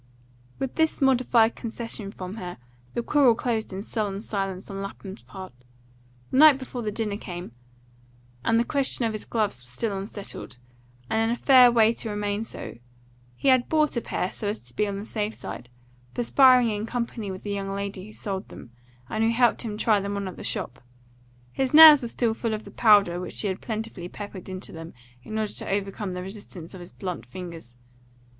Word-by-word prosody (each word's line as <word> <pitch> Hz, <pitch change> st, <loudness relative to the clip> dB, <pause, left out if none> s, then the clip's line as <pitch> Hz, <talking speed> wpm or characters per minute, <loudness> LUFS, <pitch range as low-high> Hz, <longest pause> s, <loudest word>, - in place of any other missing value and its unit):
With 270 Hz, -1 st, -4 dB
this 320 Hz, -1 st, +2 dB
modified 250 Hz, -4 st, +4 dB
concession 230 Hz, -3 st, -4 dB
from 185 Hz, +1 st, -7 dB
her, 180 Hz, -3 st, -6 dB, 0.4 s
the 235 Hz, -, -1 dB
quarrel 270 Hz, -3 st, +4 dB
closed 225 Hz, -3 st, -2 dB
in 190 Hz, +1 st, -5 dB
sullen 205 Hz, -2 st, -3 dB
silence 195 Hz, -3 st, -3 dB
on 195 Hz, 0 st, -5 dB
Lapham's 195 Hz, 0 st, -8 dB
part. 190 Hz, -6 st, -10 dB, 0.8 s
The -, -, +1 dB
night 305 Hz, -3 st, +9 dB
before 260 Hz, -2 st, -6 dB
the 215 Hz, -2 st, -2 dB
dinner 210 Hz, -1 st, -2 dB
came, 175 Hz, -, -7 dB, 0.9 s
and 230 Hz, -, +3 dB
the -, -, +3 dB
question 270 Hz, -3 st, +1 dB
of 225 Hz, -, 0 dB
his 215 Hz, -1 st, -5 dB
gloves 210 Hz, -, -1 dB
was 125 Hz, 0 st, -14 dB
still 200 Hz, -, -2 dB
unsettled, 195 Hz, -, -7 dB, 0.5 s
and 220 Hz, -, +1 dB
in 225 Hz, -, +2 dB
a 235 Hz, -, +1 dB
fair 255 Hz, -2 st, +7 dB
way 225 Hz, -1 st, +5 dB
to 230 Hz, -, -5 dB
remain 205 Hz, 0 st, -2 dB
so. 170 Hz, -, -8 dB, 0.6 s
He 275 Hz, -, +1 dB
had 255 Hz, -2 st, +4 dB
bought 305 Hz, -2 st, +2 dB
a 235 Hz, -, 0 dB
pair, 185 Hz, -, -2 dB
so 210 Hz, -, -4 dB
as 210 Hz, +2 st, -1 dB
to 120 Hz, 0 st, -18 dB
be 210 Hz, -, +1 dB
on 200 Hz, -1 st, -3 dB
the 200 Hz, -, -6 dB
safe 215 Hz, -1 st, -2 dB
side, 120 Hz, -, -8 dB, 0.5 s
perspiring 250 Hz, 0 st, +5 dB
in 210 Hz, +1 st, -3 dB
company 235 Hz, -3 st, -3 dB
with 185 Hz, 0 st, -7 dB
the 205 Hz, -, -4 dB
young 195 Hz, -1 st, -3 dB
lady 200 Hz, 0 st, -4 dB
who 215 Hz, -, -12 dB
sold 195 Hz, -2 st, -5 dB
them, 120 Hz, -, -11 dB, 0.4 s
and 220 Hz, +9 st, -1 dB
who 225 Hz, -, +4 dB
helped 235 Hz, 0 st, +3 dB
him 215 Hz, -3 st, -4 dB
try 215 Hz, -1 st, +3 dB
them 200 Hz, +1 st, -3 dB
on 200 Hz, -1 st, -3 dB
at 185 Hz, -, -7 dB
the -, -, -9 dB
shop; -, -, -4 dB, 0.7 s
his 265 Hz, -, 0 dB
nails 310 Hz, -2 st, +11 dB
were 240 Hz, -, -3 dB
still 230 Hz, -1 st, 0 dB
full 225 Hz, -1 st, -2 dB
of 215 Hz, -, -7 dB
the -, -, -11 dB
powder 205 Hz, -6 st, +5 dB
which 180 Hz, -, -6 dB
she 205 Hz, -, 0 dB
had 190 Hz, -, -4 dB
plentifully 220 Hz, -6 st, -5 dB
peppered 200 Hz, -2 st, -8 dB
into 185 Hz, 0 st, -6 dB
them 165 Hz, -2 st, -9 dB, 0.3 s
in 215 Hz, -, -6 dB
order 215 Hz, -1 st, -1 dB
to -, -, -5 dB
overcome 195 Hz, 0 st, -2 dB
the 180 Hz, 0 st, -5 dB
resistance 190 Hz, -4 st, -8 dB
of 190 Hz, -, -9 dB
his 175 Hz, 0 st, -9 dB
blunt 180 Hz, -3 st, -5 dB
fingers. 165 Hz, -1 st, -9 dB
210 Hz, 205 wpm, -26 LUFS, 195-235 Hz, 0.9 s, nails